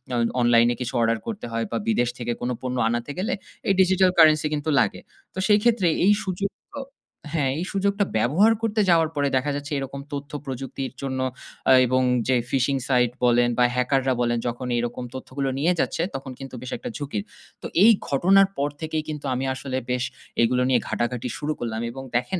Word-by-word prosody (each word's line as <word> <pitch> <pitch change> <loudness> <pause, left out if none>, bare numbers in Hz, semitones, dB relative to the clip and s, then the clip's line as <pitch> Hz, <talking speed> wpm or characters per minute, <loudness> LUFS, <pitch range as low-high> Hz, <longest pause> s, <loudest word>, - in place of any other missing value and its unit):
অ - - +1 0.2
অনলাইনে 120 0 +4
কিছু 125 - -3
অর্ডার 115 0 +2
করতে 220 -3 -5
হয় 115 0 -1
বা 115 - 0
বিদেশ 120 +2 +2
থেকে 120 0 -2
কোন 120 - -1
পণ্য 125 0 -3
আনাতে 120 +4 -2
গেলে 215 +8 -1 0.3
এই 195 - +4
digital 185 0 +4
currency 155 -2 +6
কিন্তু 150 +1 -2
লাগে। 105 -5 +1 0.3
তো - - -5
সেই 210 -1 +5
ক্ষেত্রে 230 -7 +3 0.2
এই 205 - +7
সুযোগ 195 +1 -2 0.3
আ 280 - -3 0.5
হ্যাঁ, 140 -5 +1
এই 175 - -2
সুযোগটা 200 +1 +1
ব্যবহার 165 - +4
করতে 220 -1 +1
যাওয়ার 165 -2 +4
পরে 145 -1 +1
দেখা 145 +3 -1
যাচ্ছে 145 +2 -6
এরকম 135 0 -6
তথ্য 140 0 -5
প্রযুক্তির 135 0 -5
জন্য 130 -1 -3 0.5
আ - - +7 0.2
এবং 130 +1 +2 0.3
যে 130 - +3 0.2
phishing 135 +1 +1
site 125 -2 +3
বলেন 120 0 +4
বা 125 - +4
হ্যাকাররা 130 +1 +1
বলেন 120 -1 +1
যখনই 120 +1 -2
এরকম 120 +1 -4
তথ্যগুলো 135 +1 -3
নিয়ে 170 +5 +3
যাচ্ছে। - - 0
তখন 135 -1 -6
কিন্তু 135 -1 -8
বেশ 130 - -7
১ - - -10
টা - - -2
ঝুঁকির। 135 -8 -3 0.4
তো - - -9 0.2
এই 230 - +9 0.2
ঘটনার 190 +7 +5
পর 145 +1 0
থেকেই 160 0 -2
কিন্তু 150 -2 -5
আমি 130 +1 -2
আসলে 130 0 -4
বেশ 125 -1 0 0.4
এগুলো 125 +2 +2
নিয়ে 125 -2 +4
ঘাটাঘাটি 120 +1 -2
শুরু 150 +1 -2
করলাম 115 -1 -3
এবং 135 +2 -8
দেখেন 150 +10 -2
135 Hz, 195 wpm, -24 LUFS, 125-165 Hz, 0.5 s, এই